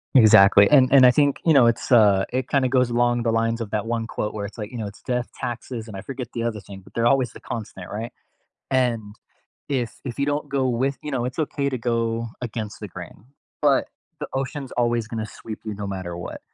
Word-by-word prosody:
Exactly, 100 -4 +7
and 130 -3 +6
and 135 -2 +8
I 125 - +8
think, 145 +1 +2
you 160 - +5
know, 130 -5 +6
it's, 115 - -1
uh, 105 -5 +5
it 130 -1 -1
kinda 135 -2 +2
goes 125 -1 +2
along 120 0 +1
the 115 - +1
lines 115 +1 0
of 110 - -4
that 110 0 -1
one 115 -1 -2
quote 105 - -3
where 100 -1 -4
it's 105 - -9
like, 105 +1 -6
you 125 - -7
know, 110 -3 -3
it's, 100 - -12
"Death, 125 -1 -2
taxes" 120 -1 -5
And 105 - -9
I 95 - -6
forget 125 -1 -7
the 115 - -3
other 115 -3 -2
thing, 100 -1 -11
but - - -19
they're 115 - 0
always 130 0 +3
the - - -12
constant, 105 -5 -7
right? 110 +3 -5 0.6
And, 115 -5 0 0.5
if 125 -5 -2
if 125 -3 -5
you 140 - +2
don't 145 0 -1
go 135 -1 +1
with 130 +3 0
you 150 - -5
know, 125 -2 -1
it's 125 +4 -5
okay 145 -2 -1
to 130 - -3
go 115 -1 -1
against 110 -3 -5
the 105 - -6
grain, 90 +3 -11 0.4
but - - +3 0.3
the - - -3
ocean's 135 0 -4
always 120 -2 0
gonna 110 -2 -3
sweep 110 0 -9
you 110 - -3
no 100 0 -6
matter 95 -3 -5
what. 85 - -7
120 Hz, 235 wpm, -23 LUFS, 110-130 Hz, 0.6 s, and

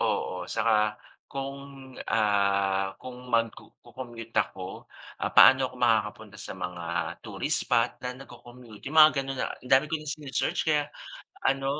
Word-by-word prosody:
Oo, - - -1
saka - - +2 0.6
kung, 135 0 -5 0.5
ah, 100 -2 +2
kung 125 -1 -8 0.2
magku 115 -1 0 0.2
co-commute 120 -3 -10
ako, 95 -1 -2 0.5
paano 135 - +9
ako - - -13
makakapunta 110 -2 0
sa - - -7
mga 90 -1 -5 0.4
tourist - - -1
spot - - +2
na 125 - -2
nagko-commute? 120 -3 -13
Yung 160 - +3
mga 155 0 +10
gano'n 135 0 -5
na - - -1
ang 125 - -14
dami 135 +3 +5
ko 160 - 0
ng 155 0 -5
sini-search 145 +1 -2
kaya 150 -1 +3 0.6
ano 135 0 0
120 Hz, 140 wpm, -27 LUFS, 105-135 Hz, 0.6 s, mga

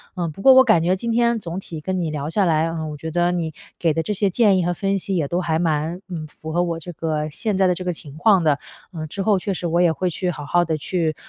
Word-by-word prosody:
嗯， 175 -3 -2
不 195 +6 -11
过 265 - +9
我 260 0 +8
感 165 -9 +4
觉 180 +2 +2
今 230 +5 -3
天 235 0 +2
总 175 -2 -5
体 165 -5 -8
跟 185 +4 -2
你 165 -3 -2
聊 150 -1 -3
下 200 +4 +1
来， 160 -1 +2
嗯， 160 -2 -4
我 - - -6
觉 160 +3 -6
得 175 +2 +1
你 170 -3 -2 0.3
给 165 -2 +2
的 165 - 0
这 210 - -2
些 200 0 +1
建 200 -1 +3
议 - - +1
和 175 - +1
分 195 +2 0
析 195 +1 -3
也 160 -5 0
都 175 +5 -1
还 165 -3 0
蛮， 160 +1 -1
嗯， 165 -5 -6
符 155 +1 -9
合 175 +2 +1
我 170 -2 -2
这 175 +2 -8
个 155 -1 -2
现 210 +5 -2
在 190 - +4
的 180 - +3
这 185 - -6
个 180 - -1
情 145 -4 -9
况 195 0 +4
的。 150 -3 +2 0.4
嗯， 155 -1 -4
之 195 +6 -4
后 205 -1 +3
确 195 +2 -3
实 175 - -5
我 170 +1 +2
也 175 -2 +4
会 180 +3 -2
去 180 +2 -2
好 150 -4 -5
好 175 +4 +2
地 160 -1 -1
去 160 +1 -1
175 Hz, 320 characters per minute, -22 LUFS, 160-190 Hz, 0.4 s, 过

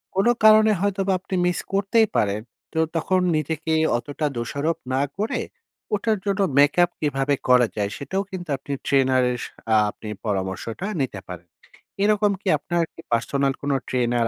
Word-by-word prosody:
কোন 195 +4 +2 0.2
কারণে 215 0 +7
হয়তোবা 195 -1 +1
আপনি 185 - -5
মিস 180 0 +1
করতেই 200 +3 +3
পারেন। 105 0 +1 0.3
তো 160 - 0 0.2
তখন 185 +3 +1 0.2
নিজেকে 160 +1 -1 0.2
অতটা 145 +5 -4
দোষারোপ 140 +7 -1 0.2
না 135 - +2 0.2
করে 215 +3 -1 0.5
ওটার 215 +1 0
জন্য 200 0 0 0.2
make 145 +3 +5
up 175 - 0
কিভাবে 140 -1 0
করা 125 -1 +6
যায়, 100 -1 0
সেটাও 190 +8 -2
কিন্তু 175 -3 -6
আপনি 140 +2 -6
ট্রেনারের 130 -2 +3
স - - -4 0.3
আ - - +6
আপনি 110 - -10 0.2
পরামর্শটা 105 - -3
নিতে 125 -7 -3
পারেন। 90 -1 -9 0.6
এরকম 210 0 +3
কি 210 - -9
আপনার 170 +3 -1
কি - - -12
পার্সোনাল 135 +4 +1
কোনো 140 -1 0
ট্রেনার 120 -2 +1
145 Hz, 160 wpm, -23 LUFS, 125-195 Hz, 0.6 s, কারণে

